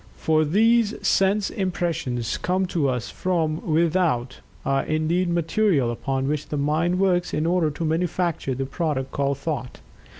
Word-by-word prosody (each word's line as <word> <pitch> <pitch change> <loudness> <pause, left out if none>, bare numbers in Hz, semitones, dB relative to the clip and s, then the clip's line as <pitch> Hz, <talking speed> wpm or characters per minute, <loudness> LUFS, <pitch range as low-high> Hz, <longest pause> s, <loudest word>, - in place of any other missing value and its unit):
For 155 -1 +2
these 220 +6 +3
sense 195 +1 +2
impressions, 170 - -2
coming 185 +1 0
to 150 -7 +1
us 125 -2 -3
from 165 -4 -1
without, 160 -6 +1 0.3
are 135 0 +1
indeed 160 +3 0
"material" 170 - +1
upon 135 +2 -2
which 150 0 -2
the 150 - -3
mind 155 +5 +1
works 180 -2 +1
in 155 - 0
order 170 -2 +2
to 155 +3 -4
manufacture 165 -3 -1
the 135 +1 -2
product 135 -2 -2
called 140 -1 0
"Thought." 140 -4 -4
160 Hz, 145 wpm, -24 LUFS, 140-180 Hz, 0.3 s, these